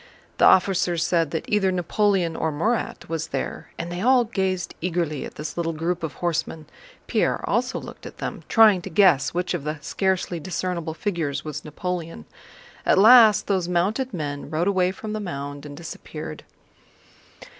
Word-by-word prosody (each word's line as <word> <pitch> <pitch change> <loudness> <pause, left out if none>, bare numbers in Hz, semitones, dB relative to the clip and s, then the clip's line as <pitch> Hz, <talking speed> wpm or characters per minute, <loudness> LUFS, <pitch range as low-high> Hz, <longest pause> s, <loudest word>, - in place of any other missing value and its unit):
The - - +6
officers 180 -2 +4
said 165 -3 +1
that 160 - -3
either 200 -3 +2
Napoleon 185 -1 +1
or 160 - -1
Murat 220 +11 -2
was 160 0 -3
there, - - -4
and 170 +1 -5
they 175 +1 -4
all 250 +2 +5
gazed 190 -5 -2
eagerly 165 -4 -2
at - - -10
this 150 0 -6
little 165 -1 -1
group 170 +2 -2
of 160 -3 -4
horsemen. 165 -2 -2 0.4
Pierre - - 0
also - - 0
looked - - -10
at - - -12
them, - - -5
trying 215 -5 +6
to 195 - -7
guess 160 -6 +4
which 180 +1 -1
of 170 -5 -3
the 150 +1 -3
scarcely 190 -2 -1
discernible 170 -1 -3
figures 170 -10 -2
was 150 -2 -5
Napoleon. 165 - -5 0.6
At - - +3
last 220 0 +7
those 190 -4 0
mounted 205 +9 0
men 145 -6 -5
rode 160 +4 0
away 185 -2 +2
from 210 +3 -7
the 215 - -2
mound 145 -6 -6
and 145 0 -10
disappeared. 165 0 -8
175 Hz, 165 wpm, -24 LUFS, 160-190 Hz, 0.6 s, last